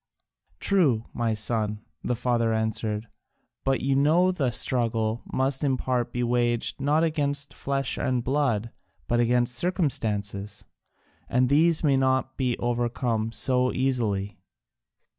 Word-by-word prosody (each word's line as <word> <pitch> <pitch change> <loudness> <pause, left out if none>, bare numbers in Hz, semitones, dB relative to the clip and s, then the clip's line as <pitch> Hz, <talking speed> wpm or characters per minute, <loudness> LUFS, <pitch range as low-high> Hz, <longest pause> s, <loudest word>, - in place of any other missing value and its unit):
"True, 140 - +2
my 115 -2 0
son," 105 -1 -2 0.2
the 125 - 0
father 115 -1 +1
answered, 110 0 -2 0.6
"but 135 0 +1
you 135 0 +1
know 160 +7 +4
the 145 -8 0
struggle 115 -2 0
must 135 +2 0
in 135 -2 +2
part 125 -2 -1
be 120 - -2
waged 120 +1 0
not 150 +3 +2
against 145 -3 -1
flesh 135 -1 -2
and 125 -2 0
blood 120 -5 0 0.4
but 120 - +1
against 120 +1 +2
circumstances, 105 - -1 0.6
and 125 0 +2
these 160 +3 +3
may 140 -3 +3
not 130 0 +1
be 125 -3 0
overcome 120 -2 -1
so 125 +1 +1
easily. 110 -7 -1
125 Hz, 125 wpm, -26 LUFS, 115-135 Hz, 0.6 s, know